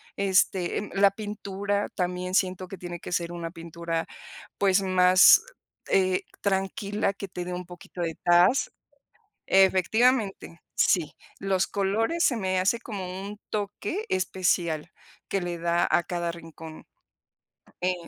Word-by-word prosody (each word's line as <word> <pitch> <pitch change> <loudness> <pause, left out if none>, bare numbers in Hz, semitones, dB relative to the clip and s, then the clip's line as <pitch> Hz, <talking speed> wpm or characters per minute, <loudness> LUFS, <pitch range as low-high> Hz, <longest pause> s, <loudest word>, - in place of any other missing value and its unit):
este, 190 -2 +1
em, 210 - -4
la 200 0 +5
pintura 205 -1 -3
también 180 0 -2
siento 185 -1 0
que 195 0 -8
tiene 175 -1 -7
que - - -8
ser 170 -1 -1
una 170 -1 -5
pintura, 165 -1 -4 0.5
pues, 195 -1 +3
más, 185 - +7 0.5
eh, 185 -1 +2 0.2
tranquila, 195 +1 -1
que 200 0 -7
te 180 -1 -6
dé 180 - -5
un 180 0 -5
poquito 175 0 -10
de 165 -2 -2
taz 175 +9 +4 0.8
efectivamente, 195 +1 +2
sí, 165 -5 +2 0.2
los 190 -1 0
colores 220 - 0
se 250 - +3
me 185 -3 0
hace 195 +5 +2
como 190 -5 -6
un 205 +1 -7
toque 210 - -3
especial 175 -3 0 0.4
que 195 - 0
le 175 -1 -3
da 170 +1 +1
a 175 - +3
cada 175 -1 -2
rincón, 165 -1 -11 1.0
eh 185 +1 +1
185 Hz, 135 wpm, -26 LUFS, 175-200 Hz, 1.0 s, más